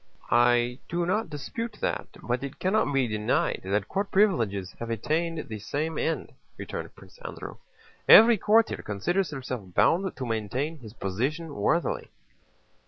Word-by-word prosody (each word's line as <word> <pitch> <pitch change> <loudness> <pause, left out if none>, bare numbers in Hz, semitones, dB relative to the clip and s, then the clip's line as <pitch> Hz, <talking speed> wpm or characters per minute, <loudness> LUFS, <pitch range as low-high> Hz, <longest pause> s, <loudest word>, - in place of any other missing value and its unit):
"I 120 +1 +3
do 170 0 0
not 210 +2 0
dispute 210 +10 -5
that, - - -2 0.2
but 125 +2 -1
it 140 -1 -6
cannot 190 -4 +1
be 135 -3 +2
denied 105 -1 0
that 100 +1 0
court 200 - -2
privileges 115 - +2
have 115 - -5
attained 160 - -1
the 110 -2 -6
same 155 +9 -3
end," 165 - -2 0.2
returned - - -6
Prince - - -17
Andrew. - - -7 0.5
"Every 225 -1 +9
courtier 220 +3 +3
considers 175 - -1
himself 125 - -6
bound 190 +3 +3
to 130 - -3
maintain 125 +8 -2
his 110 -4 -11
position 140 - -2
worthily." 155 +11 0
140 Hz, 145 wpm, -27 LUFS, 115-175 Hz, 0.5 s, Every